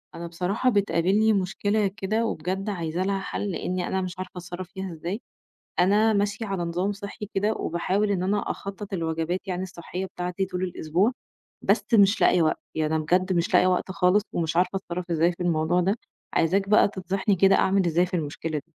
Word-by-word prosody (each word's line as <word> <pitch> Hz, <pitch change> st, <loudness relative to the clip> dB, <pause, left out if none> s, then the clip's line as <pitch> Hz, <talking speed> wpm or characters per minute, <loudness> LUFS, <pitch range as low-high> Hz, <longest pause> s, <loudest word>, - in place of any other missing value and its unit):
أنا 170 Hz, 0 st, -5 dB
بصراحة 185 Hz, +9 st, 0 dB
بتقابلني 205 Hz, 0 st, +3 dB
مشكلة 205 Hz, +2 st, +1 dB
كده 205 Hz, +4 st, -1 dB
وبجد 190 Hz, +2 st, -2 dB
عايزة 170 Hz, -2 st, -2 dB
لها 195 Hz, 0 st, 0 dB
حَل، 200 Hz, +1 st, -3 dB
لإنّي 180 Hz, 0 st, -2 dB
أنا 190 Hz, -, -1 dB
مش 185 Hz, 0 st, -5 dB
عارفة 185 Hz, -1 st, -5 dB
أتصرَّف 180 Hz, 0 st, -7 dB
فيها 190 Hz, -2 st, -5 dB
إزاي. 175 Hz, +7 st, -4 dB, 0.6 s
أنا 210 Hz, +5 st, +4 dB
ماشية 205 Hz, +2 st, 0 dB
على 195 Hz, -4 st, -2 dB
نظام 175 Hz, +4 st, -1 dB
صحّي 200 Hz, +1 st, -7 dB
كده 205 Hz, +3 st, +1 dB
وباحاول 195 Hz, +3 st, 0 dB
إن 185 Hz, -2 st, 0 dB
أنا 205 Hz, +2 st, 0 dB
أخطَّط 200 Hz, 0 st, -7 dB
الوجبات 165 Hz, +1 st, -1 dB
يعني 185 Hz, 0 st, -2 dB
الصحّية 180 Hz, +1 st, -6 dB
بتاعتي 180 Hz, +1 st, -3 dB
طول 185 Hz, -1 st, -4 dB
الأسبوع، 180 Hz, +4 st, +1 dB, 0.5 s
بس -, -, +2 dB
مش 200 Hz, -1 st, +5 dB
لاقية 180 Hz, -, +5 dB
وقت، 160 Hz, -, +1 dB, 0.2 s
يعني 155 Hz, 0 st, 0 dB
أنا 155 Hz, -, 0 dB
بجد 180 Hz, +4 st, +2 dB
مش 175 Hz, +5 st, 0 dB
لاقية 185 Hz, -, +6 dB
وقت 185 Hz, +1 st, 0 dB
خالص، 185 Hz, +2 st, +3 dB
ومش 165 Hz, -1 st, -1 dB
عارفة 180 Hz, +2 st, +2 dB
أتصرَّف 175 Hz, -1 st, -5 dB
إزاي 165 Hz, +2 st, +3 dB
في 175 Hz, -, -6 dB
الموضوع 170 Hz, 0 st, +2 dB
ده، 195 Hz, +4 st, +1 dB, 0.4 s
عايزاك 195 Hz, +4 st, +2 dB
بقى 210 Hz, -, +6 dB
تنصحني 195 Hz, +1 st, -1 dB
كده 195 Hz, +2 st, +5 dB
أعمل 190 Hz, 0 st, +3 dB
إزاي 170 Hz, +1 st, +3 dB
في 180 Hz, -, -13 dB
المشكلة. 160 Hz, -1 st, -2 dB
185 Hz, 185 wpm, -25 LUFS, 175-200 Hz, 0.6 s, لاقية